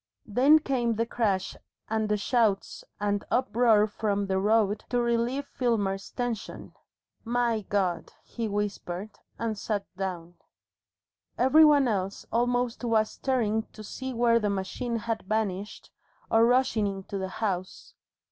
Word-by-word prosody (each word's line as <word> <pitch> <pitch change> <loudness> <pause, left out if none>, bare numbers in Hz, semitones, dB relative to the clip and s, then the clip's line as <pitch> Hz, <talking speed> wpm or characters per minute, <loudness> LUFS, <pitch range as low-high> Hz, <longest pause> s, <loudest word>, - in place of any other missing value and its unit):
Then 260 +7 +5
came 250 -6 0
the 230 +2 0
crash 205 -5 -1 0.3
and 220 -1 -1
the 210 - +2
shouts 215 -2 0 0.2
and 205 0 0
uproar 235 -3 +3
from 205 -1 -1
the 190 -1 0
road 210 0 +2
to 245 - +1
relieve 240 +3 0
Filmer's 205 -8 -1
tension. 245 -4 -5 0.5
"My 235 -1 0
God!" 185 -4 -1
he 230 -2 -4
whispered, 205 -1 -3 0.3
and 230 -1 -2
sat 205 0 -3
down. 175 -2 -5 1.0
Every 265 +6 +6
one 290 -3 +5
else 195 -3 -2
almost 245 +1 0
was 220 -2 +2
staring 220 -5 -1
to 215 - -10
see 260 +5 -6
where 235 -1 +3
the 210 -2 0
machine 200 +5 -3
had 225 0 -2
vanished, 205 -1 -3 0.4
or 225 +1 +5
rushing 245 -4 +2
into 195 0 -5
the 190 0 -3
house. 185 -4 -3
220 Hz, 135 wpm, -27 LUFS, 200-240 Hz, 1.0 s, Every